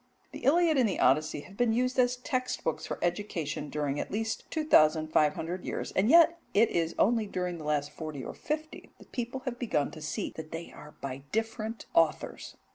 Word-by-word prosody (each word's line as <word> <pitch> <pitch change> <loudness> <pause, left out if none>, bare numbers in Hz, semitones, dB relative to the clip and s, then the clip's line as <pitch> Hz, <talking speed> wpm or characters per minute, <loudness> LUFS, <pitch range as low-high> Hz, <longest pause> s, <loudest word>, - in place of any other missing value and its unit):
The - - -8
Iliad 320 0 +4
and 235 -4 +4
Odyssey 150 +1 +3
have 190 +6 -14
been 235 +1 +2
used 255 +2 +1
as 250 0 +4
text 255 0 -2
books - - -2
for - - -3
education 170 -5 -2
during 145 -1 -2
at - - -3
least 220 +2 -3
two 315 - -1
thousand 155 - +5
five 150 -1 +3
hundred 175 +3 -4
years, - - -4
and 200 +4 +2
yet 335 +2 +7 0.2
it 225 +3 +5
is 165 -1 0
only 225 0 +3
during 180 -3 -3
the 155 - -8
last 150 -1 0
forty 155 -4 -6
or - - -6
fifty 310 +1 -5
that - - -18
people 245 +2 -4
have 255 -2 -5
begun 180 - 0
to 155 - -10
see 155 +1 -3
that 155 -1 -7
they 165 +1 -6
are 150 0 -13
by 130 -1 -4
different 225 0 -2
authors. 165 -2 0
195 Hz, 200 wpm, -30 LUFS, 155-245 Hz, 0.2 s, yet